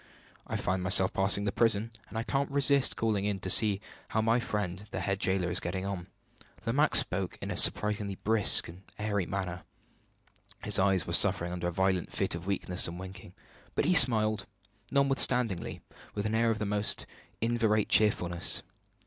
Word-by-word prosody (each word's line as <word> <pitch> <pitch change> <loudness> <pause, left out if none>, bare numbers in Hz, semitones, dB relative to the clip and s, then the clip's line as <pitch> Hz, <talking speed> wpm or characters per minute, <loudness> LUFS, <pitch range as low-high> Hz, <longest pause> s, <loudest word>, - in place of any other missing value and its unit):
I - - -5
find 95 0 -2
myself 95 +1 +3
passing 95 +1 +1
the 100 - -2
prison, 115 0 0 0.2
and - - -8
I 115 - -2
can't 135 +3 -2
resist 140 -1 +3
calling 110 -3 -1
in 100 -1 -3
to 95 - -2
see 105 -1 +3 0.3
how 110 - -2
my 115 +2 +1
friend 105 -3 -5
the - - -5
head 100 -1 -2
jailer 95 -2 -1
is - - -1
getting 95 +2 -5
on." 95 -3 -6 0.6
Lomaque 140 +7 +1
spoke 90 -1 +4
in - - -6
a - - -4
surprisingly 105 -2 +3
brisk 110 +1 +4
and 85 +3 -13 0.2
airy 100 -4 -3
manner. 90 -2 -5 1.0
His - - 0
eyes 95 -1 +1
were 85 - -6
suffering 90 -2 +1
under 90 -1 -4
a - - -3
violent 95 0 -1
fit - - -2
of 85 +2 -7
weakness 90 -2 0
and 85 +1 -8
winking; 95 -1 -11 0.4
but - - 0
he 180 - +2
smiled, 110 - +5 0.4
notwithstanding, 125 -7 +1 0.3
with 105 0 -4
an 110 - -2
air 115 +1 +1
of 110 - -1
the 105 - -4
most 105 +1 +1 0.3
inveterate 115 -2 0
cheerfulness. 90 -5 +1
100 Hz, 175 wpm, -28 LUFS, 95-110 Hz, 1.0 s, smiled